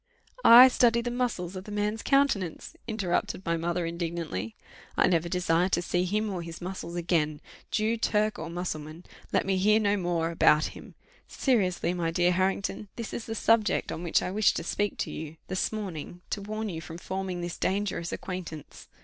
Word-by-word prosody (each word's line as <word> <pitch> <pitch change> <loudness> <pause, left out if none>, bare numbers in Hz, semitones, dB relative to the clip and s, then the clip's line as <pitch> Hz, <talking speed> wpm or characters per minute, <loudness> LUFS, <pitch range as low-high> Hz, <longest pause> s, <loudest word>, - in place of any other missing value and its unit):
I 245 +3 +11
study 235 -2 +3
the 240 +1 -3
muscles 230 -8 -2
of 185 0 -7
the 210 - -8
man's 210 +2 -1
countenance!" 275 - +1
interrupted 195 -3 -1
my 170 -1 +1
mother, 170 +1 -1
indignantly; 165 - -4 0.4
"I - - +5
never 170 -1 +1
desire 180 0 +2
to 175 - +1
see 180 +1 0
him 210 +4 0
or 180 -2 -3
his 165 -1 -8
muscles 180 -1 -6
again! 165 -4 0 0.3
Jew, 220 +1 +1
Turk, 215 -1 +1
or 160 +1 -5
Mussulman, 165 -1 -5 0.3
let - - +2
me 190 0 +1
hear 210 +3 +4
no 205 -1 +2
more 170 -3 0
about 155 -2 +4
him. - - -12 0.3
Seriously, 185 -9 +1
my 170 -2 -1
dear 175 +1 +2
Harrington, 190 +3 -1
this 230 -2 -6
is 230 - -4
the 225 - -4
subject 225 -1 +2
on - - -5
which 170 -2 +1
I 185 - -2
wished 210 +1 +3
to - - -2
speak 205 +4 -1
to - - -3
you 160 0 -7
this 185 - 0
morning, 180 -5 -6
to 200 - -2
warn 215 +1 -4
you 165 -3 -5
from 165 0 -8
forming 190 0 -4
this 175 0 -5
dangerous 190 -3 -1
acquaintance. 170 -5 -7
180 Hz, 185 wpm, -28 LUFS, 170-210 Hz, 0.4 s, I